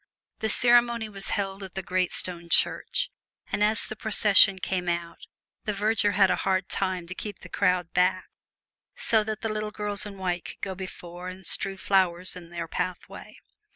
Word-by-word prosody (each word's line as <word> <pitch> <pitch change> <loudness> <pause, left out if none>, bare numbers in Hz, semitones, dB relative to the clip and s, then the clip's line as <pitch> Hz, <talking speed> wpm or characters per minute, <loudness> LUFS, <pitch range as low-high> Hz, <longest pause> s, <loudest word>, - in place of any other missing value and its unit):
The 220 - -1
ceremony 240 -1 +3
was 195 -1 -5
held 195 -1 -2
at 190 -2 -9
the 190 - -3
great 185 0 0
stone 170 -2 -1
church; - - +1 0.4
and 205 - +1
as 215 +1 +3
the 215 - -5
procession 205 -3 +6
came 185 -1 -2
out, 170 -1 -3 0.5
the 210 - -1
verger 205 0 +1
had 195 0 +4
a - - +1
hard 190 0 0
time 185 -3 -1
to 175 - -6
keep 205 +2 -7
the - - -11
crowd 180 -2 +1
back, 185 +1 +2 0.7
so 220 -1 +2
that 215 0 -4
the 225 - -2
little 215 0 -2
girls 210 -1 -3
in 200 -1 -9
white 180 -2 -2
could - - -10
go 190 - -3
before 180 -1 -8
and 185 0 -10
strew 195 -1 -1
flowers 185 -2 +1
in 175 -2 -10
their 170 -1 -5
pathway. 180 +2 -5
190 Hz, 185 wpm, -27 LUFS, 180-210 Hz, 0.7 s, procession